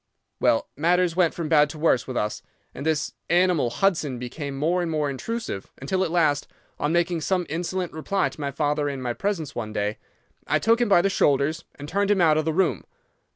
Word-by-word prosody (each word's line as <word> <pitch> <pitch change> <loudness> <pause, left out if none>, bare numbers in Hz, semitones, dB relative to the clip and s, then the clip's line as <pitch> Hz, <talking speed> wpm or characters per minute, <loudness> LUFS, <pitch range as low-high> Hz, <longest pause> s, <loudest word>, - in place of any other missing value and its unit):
"'Well, 115 - +2
matters 175 +3 +2
went 180 -3 +2
from 170 -2 -3
bad 150 -2 +4
to 155 - -8
worse 150 -6 +2
with 130 -2 -4
us, 105 0 -2 0.3
and 145 - -5
this 155 -2 0 0.2
animal 175 -7 +3
Hudson 155 -3 0
became 135 +3 -6
more 170 +5 +1
and 175 - -2
more 150 -3 0
intrusive, 180 - -5
until 185 +8 0
at 180 - -1
last, 155 -4 +2 0.3
on 145 - 0
making 170 0 +1
some 180 +2 0
insolent 175 +3 -3
reply 190 +5 0
to - - -11
my 140 - -1
father 145 +1 0
in 140 -1 -4
my 125 -2 -2
presence 165 - -2
one 110 -2 -5
day, 105 0 -2 0.5
I - - +3
took 230 +2 +2
him 240 - +2
by 175 -3 +5
the 195 - +3
shoulders 150 0 +1
and 145 - -9
turned 200 +5 0
him 205 -2 +3
out 155 -3 +4
of 155 - -1
the 160 - +1
room. 185 +1 +1
160 Hz, 210 wpm, -24 LUFS, 140-180 Hz, 0.5 s, by